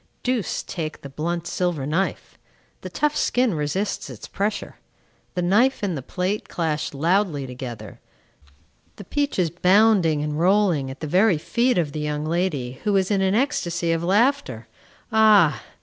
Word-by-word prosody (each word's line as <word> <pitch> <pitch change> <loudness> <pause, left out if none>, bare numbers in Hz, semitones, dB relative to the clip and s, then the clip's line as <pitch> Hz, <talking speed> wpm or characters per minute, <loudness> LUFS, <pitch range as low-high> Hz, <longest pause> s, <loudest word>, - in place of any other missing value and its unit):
Deuce 245 -7 -1
take 160 -3 -5
the 140 - -9
blunt 170 +4 -3
silver 175 -6 -2
knife! 165 +3 -2 0.5
The 185 - -7
tough 300 +10 0
skin 245 -6 +1
resists 155 +7 -2
its - - -9
pressure. 205 +2 -3 0.6
The 180 - -1
knife 215 +8 +2
and 165 -10 -3
plate 185 +3 -2
clash 160 -2 -2
loudly 165 0 0
together; 120 -4 -8 1.0
the - - -10
peach 285 +8 -2
is 175 -4 +1
bounding 180 -3 +3
and 150 0 -3
rolling 180 -6 +2
at 135 +1 -9
the - - -3
very 185 +4 +3
feet 240 +10 +1
of 160 -5 0
the 155 - -5
young 150 0 -2
lady, 155 -7 -2
who 210 -2 +1
is 190 +1 0
in 195 -2 +2
an 190 +1 +2
ecstasy 175 - 0
of 165 0 -1
laughter. 195 - +1 0.4
Ah! 215 -7 +5
175 Hz, 155 wpm, -23 LUFS, 150-205 Hz, 1.0 s, Ah